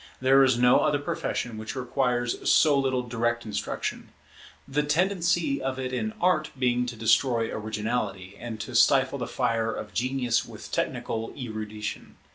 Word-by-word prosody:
There 135 +1 +5
is 130 -2 +3
no 125 +1 +5
other 145 - +2
profession 120 -5 -3
which 110 +4 -6
requires 125 -1 -1
so 150 -2 +5
little 130 -2 +1
direct 120 0 -1
instruction; 105 -2 -4 0.6
the 140 +2 +1
tendency 170 -1 +1
of 130 0 -2
it 130 -1 -4
in 220 +12 -2
Art 175 -4 +2
being 125 -1 +1
to 120 - -5
destroy 115 +1 +2
originality, 105 -3 -3
and 115 -2 -6
to 110 +4 -7
stifle 135 +3 +4
the 120 - -3
fire 115 -3 0
of 105 -1 -7
genius 125 -1 0
with - - -11
technical 115 0 -2
erudition. 110 -4 -6
125 Hz, 150 wpm, -27 LUFS, 115-135 Hz, 0.6 s, There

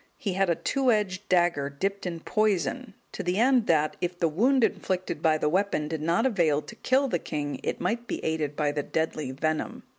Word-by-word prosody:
He 200 - -2
had 195 0 +1
a 170 - +3
two 265 - +1
edged 205 -2 -1
dagger, 175 -6 +2
dipped 195 +7 -3
in 170 -2 -5
poison, 195 -11 0 0.2
to - - -5
the 180 0 -1
end 245 0 +3
that, 155 -2 +2
if 175 0 -2
the 170 - +2
wound 240 - +2
inflicted 185 -4 -1
by 160 -1 +3
the 150 - 0
weapon 180 -2 0
did 160 0 -4
not 170 +9 +1
avail 165 - +2
to - - -11
kill 270 +2 +2
the 175 -9 -1
king, 145 -4 -4
it - - -3
might 235 +1 -2
be - - -2
aided 155 -2 -1
by 150 -1 +1
the 145 0 -2
deadly 155 -1 -2
venom. 155 +4 -2
175 Hz, 210 wpm, -27 LUFS, 155-205 Hz, 0.2 s, a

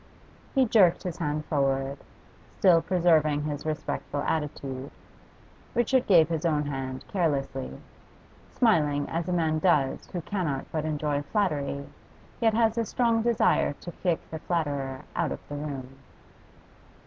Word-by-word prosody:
He 265 -1 +5
jerked 200 -7 +4
his 180 -3 -4
hand 150 -2 -2
forward, 135 -1 0 0.6
still 175 -3 +5
preserving 160 -5 +3
his 150 0 -4
respectful 150 -1 -3
attitude. 140 -4 -3 0.9
Richard 245 +2 +2
gave 170 -6 +6
his 160 -2 -2
own 150 -3 +1
hand 135 -2 -4
carelessly, 140 -7 -1 0.7
smiling 150 - +2
as 165 +2 -2
a - - 0
man 160 -3 +1
does 150 -6 +2
who 175 - -4
cannot 160 -8 -2
but 155 -1 -2
enjoy 150 -2 -1
flattery 145 -6 -1 0.5
yet 225 -2 +3
has 225 0 +2
a 230 - +1
strong 230 -2 +2
desire 230 -9 +2
to 175 - -9
kick 175 -1 -1
the 160 - -4
flatterer 145 -6 -2
out 170 -3 0
of - - -7
the 145 - -6
room. 135 -3 -6
155 Hz, 135 wpm, -27 LUFS, 145-180 Hz, 0.9 s, gave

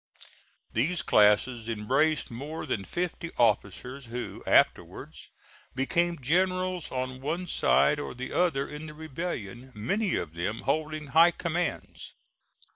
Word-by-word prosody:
These 155 +10 +1
classes 110 +3 +3
embraced 135 +8 +1
more 145 +8 -6
than 110 -9 -2
fifty 175 - -3
officers 120 +4 0
who 120 +1 -6
afterwards - - +1 0.5
became 170 +5 +1
generals 185 +4 0
on 130 0 -3
one 165 +6 -2
side 150 -3 +3
or 145 - -5
the 130 +1 -6
other 160 -6 +1
in 150 +2 -8
the 150 - -10
rebellion, 130 - -6
many 185 - 0
of 80 -2 -3
them 90 +6 -3
holding 155 -1 -2
high 165 +2 +8
commands. 175 0 -4
145 Hz, 120 wpm, -28 LUFS, 120-170 Hz, 0.5 s, high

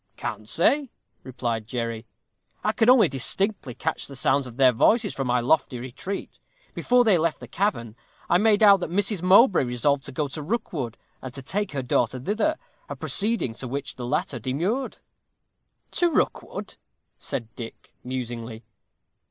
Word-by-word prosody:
"Can't 110 0 -5
say," 270 - +2 0.3
replied 120 -4 -3
Jerry. 115 -2 -4 0.6
"I 215 - +2
could 225 +1 +2
only 250 -4 +7
indistinctly 150 - -2
catch - - -3
the 140 - -10
sounds 135 +1 +1
of 120 -1 -11
their 130 -2 +6
voices 210 - +3
from 135 -2 -3
my 125 0 +2
lofty 130 0 +2
retreat. 130 +11 -6 0.3
Before 245 0 +3
they 205 -7 +4
left 165 0 0
the - - -10
cavern, 140 - -1 0.3
I 175 - +4
made 215 0 +4
out 200 -2 +8
that 175 - -4
Mrs. 195 +1 0
Mowbray 190 - +6
resolved 130 +3 0
to 140 - -7
go 145 +2 -1
to 150 +3 -6
Rookwood, 150 - -3 0.2
and 130 - -7
to 135 - -8
take 205 +5 -2
her 135 -2 -2
daughter 125 +1 0
thither 220 - 0 0.3
a - - -4
proceeding 210 - 0
to 130 - -7
which 140 +4 -4
the 120 -1 -6
latter 150 -1 -1
demurred." 175 - -2 0.9
"To 350 - +2
Rookwood," - - -2 0.4
said 115 -2 -5
Dick, 115 -2 -10
musingly. 120 -3 -5
140 Hz, 160 wpm, -25 LUFS, 125-205 Hz, 0.9 s, out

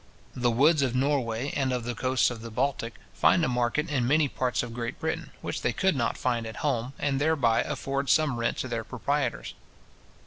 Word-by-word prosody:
The 125 -1 +1
woods 140 +6 +4
of 130 -3 0
Norway, 130 -2 0
and 135 -2 +1
of 125 -2 -1
the 120 +1 -3
coasts 130 +2 +1
of 115 -2 -7
the 115 - -7
Baltic, 120 0 -2 0.2
find 170 - +4
a - - 0
market 125 +5 0
in 130 -4 +1
many 150 +2 +4
parts 130 -2 -1
of 120 -2 -6
Great 120 0 -4
Britain, - - -3
which - - -4
they 120 - 0
could 190 +7 +2
not 120 -3 0
find 120 -3 -1
at 110 - -7
home, 130 -2 0
and 140 -1 0
thereby 140 -7 +3
afford 135 0 -3
some 155 -6 +3
rent 115 - 0
to - - -3
their 115 -2 -3
proprietors. 130 +2 -2
125 Hz, 205 wpm, -27 LUFS, 120-140 Hz, 0.2 s, woods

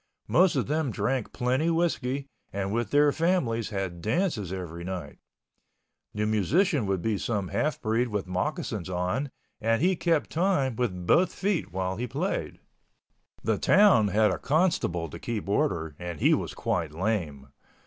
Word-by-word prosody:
Most 180 0 +4
of 130 - +1
them 155 0 0
drank 115 +3 -1
plenty 130 +6 0
whiskey 140 -5 0 0.3
and 100 0 -2
with 120 -2 -1
their 145 0 +4
families 140 - 0
had 95 -5 -4
dances 110 - 0
every 85 -3 -5
night. 90 0 -6 1.0
The 105 0 0
musician 120 - +2
would 95 -3 -1
be 110 -3 0
some 100 -6 -2
half 155 +1 -1
breed 115 +2 +1
with 105 -4 -2
moccasins 90 -1 -3
on, 90 +10 -1 0.3
and 115 +1 +2
he 180 +5 +3
kept 165 -3 0
time 160 - +1
with 95 -7 -2
both 180 - +4
feet 195 - -1
while 95 +1 -2
he 125 +2 -2
played. 150 - -3 0.9
The - - +1
town 200 - +5
had 105 +1 +3
a 90 - -3
constable 140 - +1
to 75 - -9
keep 110 -4 -4
order, 85 -6 0
and 85 -3 -5
he - - +4
was - - -2
quite 85 -4 -1
lame. 80 -7 -2
110 Hz, 160 wpm, -27 LUFS, 95-150 Hz, 1.0 s, town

